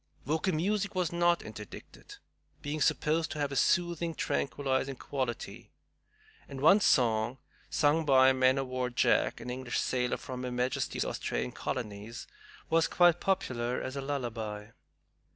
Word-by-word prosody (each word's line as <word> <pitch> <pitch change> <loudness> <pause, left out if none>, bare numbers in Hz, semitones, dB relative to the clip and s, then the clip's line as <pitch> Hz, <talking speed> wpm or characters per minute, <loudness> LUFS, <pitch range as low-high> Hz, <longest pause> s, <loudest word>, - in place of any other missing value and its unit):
Vocal 160 +5 0
music 200 +5 -1
was 180 -3 0
not 175 0 +2
interdicted, 415 - -10 0.5
being 150 +1 -3
supposed 155 +2 +1
to 150 - -6
have 145 -1 -1
a - - -4
soothing, 170 +1 +1
tranquilizing 135 -1 -1
quality; 130 -2 -5 0.8
and 135 -1 -7
one 165 +9 +6
song, 120 - +2 0.3
sung 150 +2 +2
by 135 -2 +6
"Man 130 0 +3
o' 135 - 0
War 130 -1 -2
Jack," 120 -1 +2
an 125 +1 -6
English 125 -2 -3
sailor 125 -1 0
from 125 -1 -7
her 125 -1 -4
Majesty's 125 +1 -1
Australian - - -3
colonies, 105 +3 -5 0.4
was 165 0 +3
quite 175 -1 +4
popular 125 -10 -1
as 130 - -5
a 140 - -3
lullaby. 115 -6 -4
135 Hz, 140 wpm, -30 LUFS, 125-160 Hz, 0.8 s, one